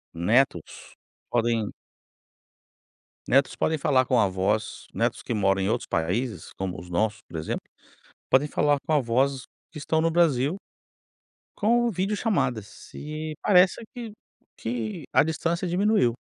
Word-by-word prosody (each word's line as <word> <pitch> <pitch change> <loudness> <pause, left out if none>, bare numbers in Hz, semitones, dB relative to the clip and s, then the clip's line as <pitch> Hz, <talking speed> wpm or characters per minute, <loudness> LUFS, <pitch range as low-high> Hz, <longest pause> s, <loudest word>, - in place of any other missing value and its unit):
netos 95 - 0 0.3
podem 115 -3 0 1.5
netos 135 +1 +3
podem 160 - 0
falar 130 -2 +3
com 125 - +2
avós, 100 +1 0
netos - - -1
que - - -3
moram 95 -2 +2
em 95 - 0
outros 115 +2 -1
países, 90 +4 -2
como 95 -3 -4
os 90 +1 -11
nossos, 105 +4 0
por 80 - -9
exemplo, 80 - -3 0.7
podem 140 +3 +4
falar 145 -1 +2
com 155 - +2
avós 130 0 +1 0.3
que - - -19
estão 160 +2 0
no 165 +1 +2
Brasil 160 -2 +2 1.0
com 235 +3 +2
videochamadas, 185 - -2
e 155 +1 -5
parece 185 +2 +4
que 235 -4 -7 0.4
que 115 +5 -4
a - - +6
distância 165 +3 -1
diminuiu. 190 - +2
130 Hz, 130 wpm, -26 LUFS, 110-165 Hz, 1.5 s, a